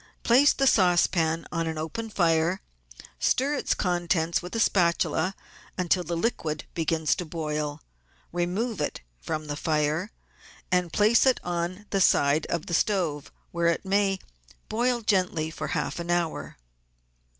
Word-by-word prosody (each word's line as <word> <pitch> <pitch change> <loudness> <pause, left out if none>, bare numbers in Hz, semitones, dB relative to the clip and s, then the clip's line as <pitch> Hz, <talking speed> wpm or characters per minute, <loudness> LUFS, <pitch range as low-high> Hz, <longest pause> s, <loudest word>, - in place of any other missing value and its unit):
Place 265 +5 +6
the 270 - 0
saucepan 175 -6 +3
on 165 -1 -1
an 160 -1 -3
open 225 +9 -4
fire, 170 -1 +2 0.6
stir 275 +3 +2
its 290 - 0
contents 175 -3 0
with 180 +5 -8
a - - 0
spatula 185 -1 +2 0.4
until 180 0 +1
the 170 0 -3
liquid 160 -7 -2
begins 160 -1 +1
to - - -3
boil, 150 -2 -4 0.5
remove 180 +4 -2
it 145 - -3 0.2
from 155 - -4
the 145 -1 -4
fire, 155 +4 0 0.6
and 180 -2 +1
place 215 - +4
it 260 - +3
on 175 +3 -3
the 195 - +1
side 145 -2 +3
of 170 -2 -2
the 175 - -5
stove, 170 -6 0 0.2
where 170 0 0
it 170 +3 0
may 195 0 +2 0.5
boil 240 +2 +1
gently 180 -7 0
for 155 -1 -5
half 150 - -2
an 170 0 -5
hour. 175 -2 -1
175 Hz, 145 wpm, -26 LUFS, 160-195 Hz, 0.6 s, Place